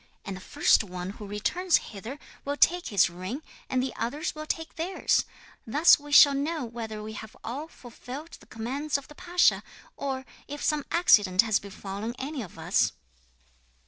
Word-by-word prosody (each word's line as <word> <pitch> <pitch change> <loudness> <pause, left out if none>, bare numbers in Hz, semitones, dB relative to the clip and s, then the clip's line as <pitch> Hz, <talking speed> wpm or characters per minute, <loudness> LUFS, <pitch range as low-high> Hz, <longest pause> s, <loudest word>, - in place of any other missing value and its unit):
And 195 - -4
the 185 - -9
first - - +3
one 180 -1 -6
who 205 0 -9
returns 330 - +1
hither 220 +7 -7 0.3
will 285 +1 -3
take 355 +3 +3
his 200 -4 +4
ring, 185 - -6 0.3
and 255 -1 +1
the 260 - -3
others 290 +8 -2
will 310 0 -7
take 325 0 -3
theirs. 345 +4 +1 0.4
Thus 295 +9 +6
we 290 0 -11
shall 285 -1 +9
know 295 +1 -1
whether 225 -2 -6
we 215 +1 -6
have 220 0 -9
all 275 +7 -5
fulfilled 265 +3 -10
the - - -19
commands 275 +7 -2
of 280 - -10
the - - -11
pasha, 355 +2 +3 0.3
or 265 -1 -3 0.2
if 290 +1 -6
some 300 -2 +1
accident 205 - +5
has 220 -2 +2
befallen 200 +3 -6
any 275 +1 -4
of 190 -7 -10
us." 160 - +2
255 Hz, 175 wpm, -28 LUFS, 210-300 Hz, 0.4 s, shall